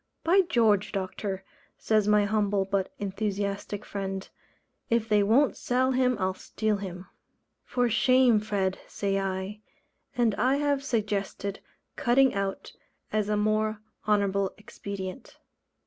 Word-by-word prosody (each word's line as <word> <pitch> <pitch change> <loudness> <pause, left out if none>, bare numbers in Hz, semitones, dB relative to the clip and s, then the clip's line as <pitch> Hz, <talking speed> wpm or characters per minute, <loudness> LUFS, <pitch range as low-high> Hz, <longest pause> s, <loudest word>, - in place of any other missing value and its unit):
"By 370 +4 +5
George, 225 - +2
Doctor," 190 0 -3 0.3
says 215 -2 +2
my 210 -1 +4
humble 205 -2 +1
but 195 -1 -1
enthusiastic 200 0 -3
friend, 195 -1 -4 0.6
"if 230 -1 +1
they 210 -2 +4
won't 235 +8 +3
sell 255 +1 +1
him 250 -2 +2
I'll 185 0 0
steal 215 +2 -2
him." 185 -2 -7 0.6
"For 245 -1 0
shame, 240 +1 +4
Fred," 200 -3 -1
say 195 -1 -1
I. 195 +2 -3 0.6
And 235 -3 +3
I 260 +2 +3
have 285 -1 0
suggested 205 -5 -2 0.4
"cutting 260 +2 +4
out" 195 -1 -3 0.4
as 210 -1 +1
a 210 - +1
more 215 0 +1 0.3
honourable 200 -2 +1
expedient. 200 +1 -7
210 Hz, 125 wpm, -28 LUFS, 195-235 Hz, 0.6 s, By